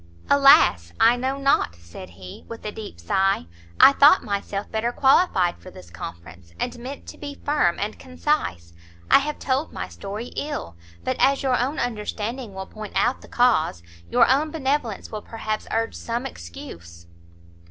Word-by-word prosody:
"Alas, 90 - +6
I 230 +2 +6
know 260 +2 -2
not!" 275 - +2
said 85 0 -12
he, 90 -1 -11
with 230 -1 -9
a 210 - -3
deep 210 - -9
sigh, 190 - +1 0.3
"I - - +9
thought 290 +5 +6
myself 200 -1 -4
better 225 +2 -1
qualified 255 - +3
for 185 - -12
this 90 - -14
conference, 85 0 -10
and 240 -1 -3
meant 265 +4 -8
to - - -11
be 285 -1 -7
firm 285 - +2
and 210 +2 -4
concise. 255 - -2 0.4
I - - +8
have 295 +1 -3
told 270 +3 -1
my - - -5
story 210 +5 -7
ill, 285 - -4 0.3
but - - -1
as 275 +1 +3
your 260 -2 +2
own 260 +5 -1
understanding 225 0 -4
will 190 0 -5
point 215 0 -9
out 245 - +1
the - - -13
cause, 190 - +2 0.3
your - - +5
own 285 +4 +2
benevolence 275 -7 -2
will 215 -1 -5
perhaps 215 -1 -4
urge 225 0 -1
some 235 +2 -4
excuse. 85 - -10
225 Hz, 165 wpm, -23 LUFS, 165-270 Hz, 0.4 s, I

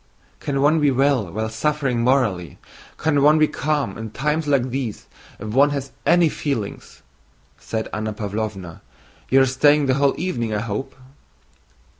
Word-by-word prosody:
"Can 135 -1 -1
one 155 +3 +4
be 145 -1 +3
well 135 -7 +1
while 110 +3 -2
suffering 135 +2 -1
morally? 115 -9 +1 0.4
Can 150 -2 +1
one 150 +2 +5
be 155 0 +4
calm 145 -10 -2
in 110 0 -5
times 150 +7 -1
like 130 -3 +1
these 125 -5 -4 0.3
if 105 - -7
one 135 +6 +4
has 140 -2 -4 0.2
any 170 -1 +5
feeling?" 140 -9 -3 0.8
said 110 -1 -4
Anna 110 0 -2
Pávlovna. 100 -4 -5 0.5
"You 135 +1 +5
are - - +5
staying 145 +3 +3
the 130 - +2
whole 140 +1 +2
evening, 120 -11 -2
I 105 - -1
hope?" 115 +5 -4
135 Hz, 155 wpm, -21 LUFS, 110-145 Hz, 0.8 s, one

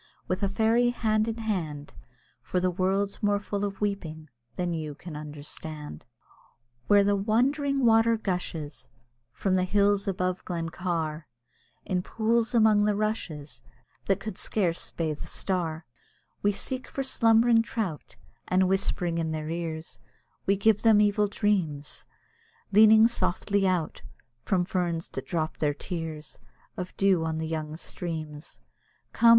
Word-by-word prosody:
With 185 - -1
a 200 - +1
fairy 225 +4 +3
hand 215 -2 +1
in 225 0 -2
hand, 165 -10 -3 0.5
For 180 +9 -1
the 185 0 +1
world's 195 +3 0
more 205 -1 +3
full 205 0 -3
of 200 -1 -3
weeping 160 -7 -3 0.3
than 180 -1 -1
you 155 -3 -4
can 165 +1 -9
understand. 150 - -7 0.8
Where 205 -1 +6
the 200 0 +3
wandering 265 +7 +1
water 225 0 +5
gushes 175 -7 -4 0.4
From 190 - -1
the 185 - +2
hills 200 +1 +2
above 185 -1 -1
Glen 170 -2 -3
Car, 165 -3 -3 0.6
In 180 -1 0
pools 230 +4 0
among 215 -2 +5
the 210 -1 +2
rushes, 195 -9 -3 0.5
That 195 - +1 0.2
scarce 180 -6 -1
could - - -25
bathe 155 -3 -2
a - - -9
star, 165 -4 -2 0.6
We 205 - +3
seek 255 +5 -5
for 275 - -3
slumbering 230 -2 +4
trout, 215 - -4 0.3
And 185 0 +3
whispering 180 -3 0
in 160 -1 -1
their 155 0 -3
ears; 165 -1 -4 0.5
We 195 +1 +3
give 210 +1 +3
them 220 -2 +6
evil 210 0 +3
dreams, 180 -9 -1 0.7
Leaning 220 +2 +8
softly 200 -3 0
out 175 -4 -1 0.4
From 180 -3 +2
ferns 175 -3 -2
that - - -6
drop 160 -2 -2
their 145 -2 0
tears 160 -3 -6 0.4
Of 180 0 -6
dew 195 -4 +3
on 160 -1 -2
the 160 - -2
young 155 -1 -4
streams. 160 -3 -6 0.5
Come! 235 - +5
185 Hz, 145 wpm, -27 LUFS, 160-210 Hz, 0.8 s, Leaning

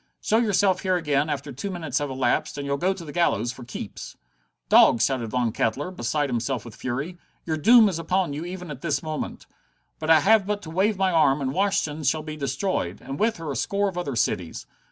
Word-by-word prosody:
Show 220 - +1
yourself 200 -4 +2
here 185 -1 +1
again 150 -3 0
after 145 -1 -3
two 140 +10 -5
minutes 160 -7 -2
have 145 -1 -3
elapsed, 130 +1 0
and 140 - -4
you'll 140 0 -1
go 180 +6 +1
to 190 -3 -6
the 150 - -7
gallows 120 -9 +1
for 125 0 -11
keeps." 120 - -8 0.5
"Dogs!" 115 - +6
shouted 130 -4 -1
Von 120 0 0
Kettler, 135 +9 -1
beside 150 -5 -1
himself 120 -1 -2
with 115 - -10
fury. 140 +8 -4 0.3
"Your 160 - -1
doom 225 +8 +6
is 180 -4 -2
upon 180 -1 0
you 150 +3 -4
even 180 -1 -7
at 135 -2 -8
this 150 -4 -1
moment. 155 -1 -5 0.6
I 160 0 +5
have 215 -1 +4
but 205 0 -2
to 160 - -8
wave 195 +4 +1
my 190 -1 +2
arm, 150 -4 +3
and 135 -1 -2
Washington 190 -6 0
shall 155 +3 +1
be 155 0 -6
destroyed, 135 - -2
and 135 +2 -7
with 225 +1 +1
her 160 -3 -5
a - - -4
score 200 - 0
of 185 - -10
other 145 -7 -3
cities. 90 -6 -1
155 Hz, 215 wpm, -25 LUFS, 135-185 Hz, 0.6 s, Dogs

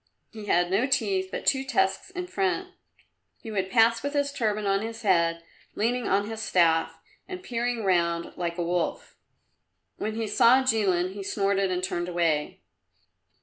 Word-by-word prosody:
He 215 -2 -9
had 175 -1 +2
no 215 +7 +2
teeth, 195 -8 0
but - - -5
two 265 -1 +2
tusks 200 - 0
in 360 -1 -5
front. 370 0 -1 0.7
He 225 - -9
would 190 -2 -2
pass 230 +1 +4
with 285 +1 -3
his 285 -1 0
turban 215 -5 -1
on 195 0 +1
his 225 +1 -6
head, 170 -4 +2 0.3
leaning 240 +3 0
on 200 +1 +1
his 220 0 -5
staff, 170 -5 +2 0.3
and 365 -1 -7
peering 240 - -2
round 170 -3 0
like 170 -1 -3
a 175 - -1
wolf. 175 0 -2 0.8
When 215 +1 -3
he 225 0 -2
saw 235 +5 +4
Jilin 190 -7 +1
he 200 - -7
snorted 195 0 0
and 180 0 -2
turned 175 -1 -2
away. 165 -4 -1
205 Hz, 165 wpm, -26 LUFS, 180-235 Hz, 0.8 s, pass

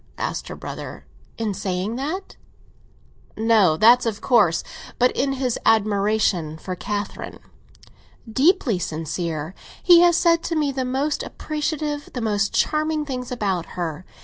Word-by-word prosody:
asked - - -3
her - - -6
brother. - - -8 0.3
"In 220 -3 -2
saying 190 +2 -3
that?" 320 +9 -4 1.0
"No; 215 -8 +4
that's 235 +4 +6
of 215 -2 -2
course. 180 -10 +3 0.3
But 250 +1 +4
in 270 +1 0
his 255 -3 -1
admiration 205 -6 +2
for 185 +3 -5
Catherine?" 205 +3 -5 0.9
"Deeply 260 - +2
sincere. 160 0 -4 0.3
He 350 -2 +8
has 345 -1 +5
said 335 -2 +3
to 335 - -2
me 300 -3 +1
the 260 -1 -2
most 275 +4 -1
appreciative, 300 -1 -3
the 245 - -2
most 210 -2 0
charming 305 0 0
things 250 -3 -5
about 195 -8 -1
her. 170 -1 -3
225 Hz, 135 wpm, -22 LUFS, 190-290 Hz, 1.0 s, He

